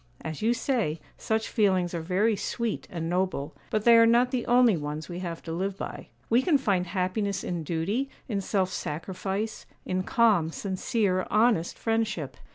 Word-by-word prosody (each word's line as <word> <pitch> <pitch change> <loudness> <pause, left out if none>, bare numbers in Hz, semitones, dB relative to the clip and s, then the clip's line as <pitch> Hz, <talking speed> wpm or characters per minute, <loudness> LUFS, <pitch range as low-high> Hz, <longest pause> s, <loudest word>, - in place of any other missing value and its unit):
As 160 -1 -6
you 230 +3 +2
say, 230 - -1 0.2
such 220 0 -1
feelings 185 -5 +1
are 170 - -2
very 195 +6 +1
sweet 230 +3 -3
and 165 -2 -4
noble; 175 -4 -1 0.2
but 215 -1 0
they 235 - +8
are 230 0 +7
not 240 +2 +4
the 250 -3 -2
only 245 -3 +5
ones 150 0 -4
we 175 0 -6
have 170 -3 -5
to 165 - -6
live 190 +3 -2
by. - - -6 0.2
We 235 +2 +4
can 295 +1 +3
find 195 -9 0
happiness 195 +2 -1
in 175 -2 -3
duty, 185 - -1 0.2
in 205 -4 -1
self 190 -1 0
sacrifice, 190 +7 -4 0.2
in 185 0 -1
calm, 200 -5 +3
sincere, 190 +1 -1
honest 215 -6 +2
friendship. 220 - -1
195 Hz, 170 wpm, -27 LUFS, 175-225 Hz, 0.2 s, they